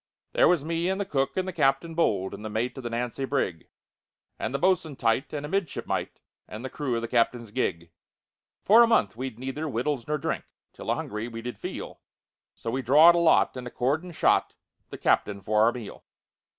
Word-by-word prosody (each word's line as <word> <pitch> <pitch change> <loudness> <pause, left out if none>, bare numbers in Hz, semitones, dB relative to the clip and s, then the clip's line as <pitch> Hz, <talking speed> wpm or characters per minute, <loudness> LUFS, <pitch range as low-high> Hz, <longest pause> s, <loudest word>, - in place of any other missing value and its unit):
"There - - +5
was 165 -4 +2
me 165 +2 -1
and 190 +1 -1
the 200 - -1
cook 135 -5 -1
and 185 0 0
the 185 - -4
captain 135 +3 +1
bold, 100 - 0
And - - -8
the 110 - -4
mate 110 +4 -2
of 135 - -7
the 120 - -3
Nancy 120 +3 -3
brig, 130 - -2 0.7
And - - -2
the 140 - -1
bo'sun 170 -3 +1
tight, 125 +4 0
and 150 -1 -4
a - - -6
midshipmite, 195 -3 -2 0.3
And 110 +4 -8
the 130 - -5
crew 140 -5 -2
of 115 - -2
the - - -2
captain's 115 -1 0
gig. 85 -8 -2 0.7
"For 225 +4 +7
a 235 - +7
month 105 - +2
we'd 130 -1 -5
neither 135 +5 -4
wittles 125 0 -2
nor 150 0 0
drink, - - -3 0.3
Till - - -8
a - - +3
hungry 105 +2 -4
we 115 -1 -7
did 125 0 -6
feel, - - -7 0.5
So 115 - -5
we 130 - -1
drawed 150 +7 +7
a 170 - +2
lot, 165 -5 +4
and 125 -1 -6
accordin' 145 +9 -1
shot 160 - +2 0.3
The - - -7
captain 100 -1 +1
for 105 +2 +1
our 115 - +5
meal. 120 -4 -9
130 Hz, 210 wpm, -27 LUFS, 115-160 Hz, 0.7 s, For